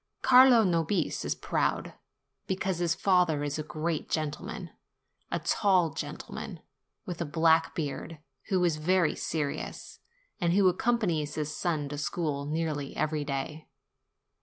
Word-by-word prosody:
Carlo 250 -2 +7
Nobis 170 -1 0
is - - -1
proud, - - -1 0.5
because 190 -1 -1
his 170 -1 +1
father 180 -6 +2
is 145 +1 -2
a - - -2
great 155 +1 -3
gentleman; 155 -2 -3 0.6
a - - -1
tall 185 -6 +2
gentleman, - - -6 0.5
with 175 -1 -5
a - - +2
black 160 +1 +3
beard, 155 +1 -4 0.3
who 185 -4 +1
is 170 -3 +2
very 175 +1 +2
serious, 150 -3 -4 0.4
and 170 -3 +2
who 195 0 +5
accompanies 180 -7 +1
his 150 0 -3
son 155 -5 -1
to 145 0 -5
school 145 -2 -2
nearly 150 -2 -2
every 155 -1 0
day. 145 +2 -4
160 Hz, 135 wpm, -29 LUFS, 150-180 Hz, 0.6 s, Carlo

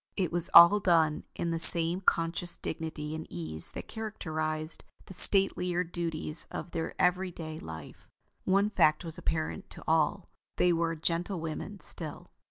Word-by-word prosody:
It 185 -5 -1
was 175 -1 +4
all 170 +5 +9
done 165 -5 +1
with 170 - -2
the 165 - -2
same 170 +2 +6
conscious 175 -1 +1
dignity 155 -1 -6
and 160 0 -7
ease 80 -2 -1
that - - -8
characterized 155 -8 -4 0.2
the - - -11
statelier 180 -2 +3
duties 165 -2 -4
of 175 - -7
their 165 -1 -5
every 180 +1 +1
day 160 -2 -8
life. 80 -2 -11 0.4
One 200 +2 +1
fact 155 -3 +2
was 165 -1 -6
apparent 160 -1 -4
to - - -11
all: 160 +4 0 0.3
they 180 -1 +3
were 165 0 -1
gentlewomen 170 +3 -4
still. 155 -3 0
165 Hz, 150 wpm, -29 LUFS, 155-180 Hz, 0.4 s, all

